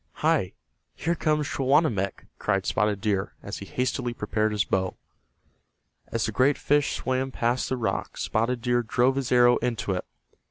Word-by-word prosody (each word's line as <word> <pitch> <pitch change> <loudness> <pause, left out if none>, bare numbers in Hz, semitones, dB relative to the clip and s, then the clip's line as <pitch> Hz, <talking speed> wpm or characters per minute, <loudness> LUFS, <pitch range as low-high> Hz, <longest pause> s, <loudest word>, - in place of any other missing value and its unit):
"Hi, - - +2 0.4
here 170 - 0
comes 150 -3 0
Sehawanammek!" 135 - +1
cried 95 -2 0
Spotted 105 -1 +1
Deer, 100 -2 0
as 100 - -6
he 100 - -8
hastily 125 0 -2
prepared 105 0 0
his 105 -2 +1
bow. 95 -1 -1 1.1
As 115 - -1
the 110 - -2
great 130 +6 +3
fish 145 0 +2
swam 130 +1 -1
past 120 0 0
the 130 - -1
rock 115 - -2
Spotted 115 +2 0
Deer 120 -1 +2
drove 125 +3 +2
his 135 -2 -2
arrow 120 0 +6
into 115 -4 -2
it. 90 -1 -1
120 Hz, 160 wpm, -26 LUFS, 105-130 Hz, 1.1 s, arrow